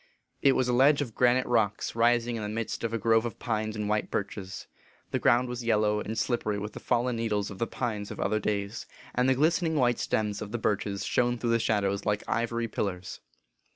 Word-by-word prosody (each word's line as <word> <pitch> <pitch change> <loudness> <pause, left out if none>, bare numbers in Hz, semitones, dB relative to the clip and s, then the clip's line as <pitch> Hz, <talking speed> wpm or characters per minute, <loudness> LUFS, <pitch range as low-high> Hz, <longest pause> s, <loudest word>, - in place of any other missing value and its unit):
It 140 - +5
was 130 - +1
a 125 - +1
ledge 140 +4 +5
of 120 -5 -9
granite 125 +2 +3
rocks 110 -4 0
rising 120 0 +2
in 115 - -4
the 105 - -3
midst 110 +2 -3
of 115 - -1
a 115 - 0
grove 115 0 +3
of 120 - -5
pines 110 -2 -2
and 105 -1 -2
white 105 0 0
birches. 95 -2 -4 0.5
The - - 0
ground 125 +1 +3
was 120 0 -5
yellow 105 -2 +2
and 110 +1 -4
slippery 110 -4 0
with 105 +1 -5
the - - -7
fallen 120 0 0
needles 105 -3 -1
of 100 - -9
the 115 - 0
pines 105 -5 -3
of - - -8
other 110 - +1
days, 100 +1 -3 0.3
and 125 +1 +2
the 130 - +4
glistening 160 +3 +2
white 120 -4 +2
stems 105 -1 -1
of 105 -1 -6
the 120 - -1
birches 100 -3 -1
shone 120 0 +1
through 120 0 -1
the 115 - +4
shado 110 -2 +1
ws 100 +1 -4
like 105 0 0
ivory 115 0 -1
pillars. 95 -4 -4
115 Hz, 220 wpm, -28 LUFS, 105-120 Hz, 0.5 s, It